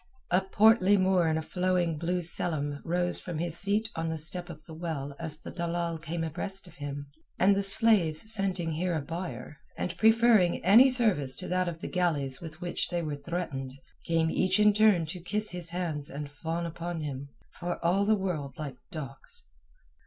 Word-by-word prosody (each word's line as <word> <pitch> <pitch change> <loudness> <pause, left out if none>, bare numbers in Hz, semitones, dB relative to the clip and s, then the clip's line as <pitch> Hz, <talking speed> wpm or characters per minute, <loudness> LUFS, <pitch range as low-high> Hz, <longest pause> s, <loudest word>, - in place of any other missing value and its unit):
A 180 +2 +4
portly 205 0 +4
Moor 185 -2 +3
in 160 0 +1
a 160 - -3
flowing 180 -2 0
blue 175 +2 -1
selham 145 -4 +1
rose 175 +1 +1
from 175 -3 -6
his 170 0 -1
seat 205 +2 0
on 165 0 -2
the 160 - -3
step 175 +3 -1
of 155 -2 -11
the 160 - -11
well 155 -4 -5
as 160 -2 -5
the - - -10
dalal 170 -1 -3
came 165 +1 -4
abreast 190 +5 -3
of 175 - -16
him, 145 0 -6 0.3
and 195 +2 +4
the 200 - +1
slaves 200 -2 +4
scenting 190 -5 0
here 170 +2 -1
a - - 0
buyer, 150 -4 -6 0.2
and 180 - -3
preferring 220 -6 +4
any 230 +8 +8
service 205 - +2
to - - -5
that 185 0 0
of 170 -1 -5
the - - -4
galleys 155 -6 -1
with 160 -1 -10
which 175 -1 -2
they 175 -1 -2
were 150 -2 -3
threatened, 140 -3 -5 0.3
came 165 -1 +1
each 185 +1 +1
in 210 0 +5
turn 205 -5 +4
to 165 +4 -7
kiss 210 +5 -1
his 175 -2 -3
hands 165 -5 -1
and 145 0 -6
fawn 165 +3 -4
upon 170 0 -5
him, 140 -2 -5 0.2
for 175 0 -4
all 185 +4 +3
the 215 +2 +3
world 160 -9 -3
like 140 -4 -6
dogs. 160 - -8
170 Hz, 190 wpm, -29 LUFS, 155-185 Hz, 0.3 s, any